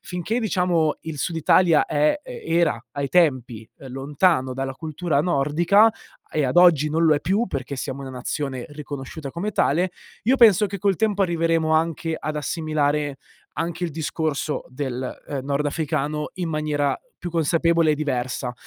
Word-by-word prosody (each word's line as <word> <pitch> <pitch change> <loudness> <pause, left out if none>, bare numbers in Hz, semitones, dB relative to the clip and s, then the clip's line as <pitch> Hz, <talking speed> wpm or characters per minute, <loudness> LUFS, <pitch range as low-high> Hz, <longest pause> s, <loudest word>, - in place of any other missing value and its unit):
finché 180 +6 -2
diciamo 180 -8 +1
il 160 -2 -6
Sud 170 - -2
Italia 165 0 +4
è 150 - +1
era 170 - 0
ai 140 -1 -3
tempi, 130 -8 +1 0.2
lontano 135 +1 +1
dalla 135 0 -3
cultura 160 +1 -1
nordica, 175 +7 +3 0.4
e 155 -2 0
ad 130 +5 -1
oggi 165 -4 +6
non 165 +2 +1
lo 155 -2 +5
è 145 - -1
più 200 +9 +1
perché 140 -4 -5
siamo 135 +1 -5
una 135 - -7
nazione 130 0 -4
riconosciuta 145 0 -7
come 190 +8 -4
tale, 180 +2 +1 0.3
io 255 +5 +4
penso 215 -4 +6
che 200 0 -6
col 195 0 +1
tempo 205 -1 +1
arriveremo 165 -3 +1
anche 165 0 0
ad 155 - -4
assimilare 150 -2 -1 0.4
anche 170 +1 -3
il 170 - -2
discorso 155 -1 -2
del, 130 -1 -4
ehm, 135 -3 -4
nordafricano 150 +1 -1
in 180 -2 -3
maniera 150 -2 -1 0.2
più 175 - -6
consapevole 165 0 +2
e - - +1
diversa. 130 -3 -2
155 Hz, 155 wpm, -23 LUFS, 140-175 Hz, 0.4 s, oggi